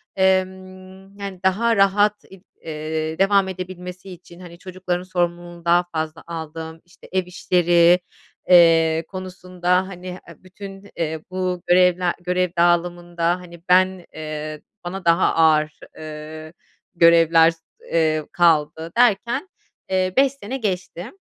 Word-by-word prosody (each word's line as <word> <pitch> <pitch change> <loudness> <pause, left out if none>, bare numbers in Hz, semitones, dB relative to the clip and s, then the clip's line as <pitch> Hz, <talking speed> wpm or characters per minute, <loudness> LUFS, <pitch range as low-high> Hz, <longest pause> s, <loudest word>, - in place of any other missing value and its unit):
emm, 190 0 -2
yani, 195 -2 -6
daha 225 +5 +2
rahat 205 +1 +2
ib 190 -1 -14 0.2
eee, 155 0 -4
devam 195 0 +3
edebilmesi 185 0 -8
için, 175 -1 -14
hani, 175 -2 -12
çocukların 180 -1 -4
sorumluluğunu 175 -1 -3
daha 175 +1 +4
fazla 160 0 -4
aldım. 160 0 -7
İşte, 175 - -19
ev 185 0 0
işleri, 175 -1 +3 0.5
eee, 165 -2 +5
konusunda, 185 -1 -2
hani, 180 -1 -10
eee, 180 -2 -10
bütün, 195 +1 -11
eee, 160 -1 -3
bu 185 -1 -2
görevler 180 0 +3
görev 180 0 0
dağılımında, 175 0 +1
hani, 170 -2 -13
ben, 185 0 +3
eee, 155 -1 -6 0.2
bana 180 +1 -6
daha 170 0 +3
ağır, 155 -2 +2 0.2
eee, 155 +1 -9 0.4
görevler, 165 -1 +5 0.3
eee, 155 -2 0
kaldı. 160 -1 +1
Derken, 235 - +2 0.4
eee, 185 -1 0
5 270 0 +4
sene 265 -1 -6
geçti, 190 -2 -4
180 Hz, 120 wpm, -21 LUFS, 165-185 Hz, 0.5 s, eee